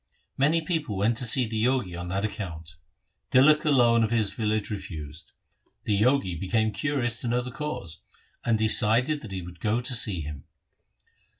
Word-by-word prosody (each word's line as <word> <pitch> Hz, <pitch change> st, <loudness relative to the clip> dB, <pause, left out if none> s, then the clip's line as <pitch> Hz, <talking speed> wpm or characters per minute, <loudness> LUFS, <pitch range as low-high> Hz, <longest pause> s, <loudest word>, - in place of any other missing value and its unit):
Many 150 Hz, +5 st, +2 dB
persons 160 Hz, -2 st, -2 dB
went 105 Hz, +3 st, 0 dB
to 125 Hz, -, +2 dB
see 125 Hz, +2 st, +3 dB
the 110 Hz, 0 st, -2 dB
Jogi 120 Hz, -8 st, 0 dB
on 90 Hz, +1 st, -6 dB
that 95 Hz, +3 st, -2 dB
account 85 Hz, -6 st, -7 dB, 0.6 s
Tilak 150 Hz, +4 st, +5 dB
alone 120 Hz, -5 st, +4 dB
of 110 Hz, -, 0 dB
his 110 Hz, -4 st, +1 dB
village 110 Hz, -1 st, -1 dB
refused. 80 Hz, -6 st, -8 dB, 0.5 s
The 100 Hz, -2 st, 0 dB
Jogi 125 Hz, -6 st, +2 dB
became 110 Hz, +6 st, 0 dB
curious 120 Hz, -1 st, -1 dB
to 125 Hz, -, -4 dB
know 120 Hz, +1 st, +1 dB
the 125 Hz, -, -7 dB
cause, 105 Hz, -, -6 dB, 0.4 s
and 115 Hz, -2 st, +1 dB
decided 115 Hz, +6 st, +3 dB
that 110 Hz, -, -10 dB
he 95 Hz, -2 st, -5 dB
would 90 Hz, 0 st, -11 dB
go 110 Hz, +2 st, 0 dB
to 125 Hz, +1 st, -1 dB
see 105 Hz, -7 st, +1 dB
him. 75 Hz, -2 st, -8 dB
110 Hz, 175 wpm, -26 LUFS, 95-125 Hz, 0.6 s, Tilak